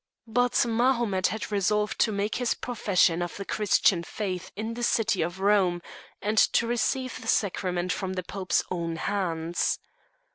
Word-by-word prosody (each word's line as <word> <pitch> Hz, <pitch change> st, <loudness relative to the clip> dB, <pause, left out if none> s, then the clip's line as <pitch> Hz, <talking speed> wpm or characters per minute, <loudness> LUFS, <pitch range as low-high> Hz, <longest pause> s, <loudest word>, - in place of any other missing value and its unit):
But 245 Hz, +2 st, +2 dB
Mahomet 235 Hz, -5 st, +2 dB
had 220 Hz, 0 st, -4 dB
resolved 210 Hz, +1 st, 0 dB
to 220 Hz, -, +3 dB
make 205 Hz, +1 st, -1 dB
his 245 Hz, -1 st, 0 dB
profession 190 Hz, -7 st, +1 dB
of 175 Hz, -1 st, -4 dB
the 200 Hz, -, -5 dB
Christian 200 Hz, -4 st, +2 dB
faith 185 Hz, 0 st, -5 dB
in 220 Hz, +3 st, -4 dB
the 240 Hz, -, -6 dB
city 225 Hz, -3 st, +1 dB
of 175 Hz, +3 st, -3 dB
Rome, 195 Hz, -3 st, +3 dB, 0.4 s
and 215 Hz, +1 st, +2 dB
to 235 Hz, -, +4 dB
receive 250 Hz, +2 st, -1 dB
the 225 Hz, -, -9 dB
sacrament 185 Hz, -4 st, 0 dB
from 190 Hz, -1 st, -3 dB
the 185 Hz, -1 st, -3 dB
Pope's 185 Hz, +1 st, -1 dB
own 170 Hz, -2 st, -2 dB
hands. 170 Hz, -2 st, -1 dB
200 Hz, 155 wpm, -27 LUFS, 180-225 Hz, 0.4 s, to